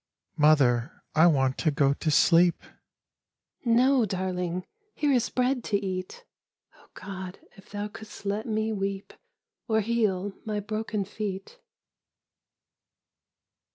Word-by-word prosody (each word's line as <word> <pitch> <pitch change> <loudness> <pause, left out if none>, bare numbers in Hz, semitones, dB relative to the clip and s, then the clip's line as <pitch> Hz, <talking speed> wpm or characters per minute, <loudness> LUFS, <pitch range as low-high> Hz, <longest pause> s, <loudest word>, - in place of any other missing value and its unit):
" - - -52
Mother, 125 -3 +2
I 160 +3 +6
want 135 -5 +2
to 160 - +2
go 140 -1 +2
to 155 - -2
sleep." 170 +3 +4 0.6
" - - -53
No, 250 +2 +4
darling! 180 -2 -2 0.3
Here 295 -1 +1
is 245 -2 +2
bread 250 0 0
to 205 - +1
eat! 185 - -5 0.5
(Oh, - - -23
God 190 -1 -7 0.2
if 195 - -17
thou 205 0 -4
couldst 215 0 -12
let 205 +3 -2
me 220 0 -1
weep 195 -1 -4 0.5
Or 220 -2 +2
heal 205 -3 0
my 210 -1 -2
broken 215 0 -3
feet 205 - -6
200 Hz, 125 wpm, -27 LUFS, 180-220 Hz, 0.6 s, I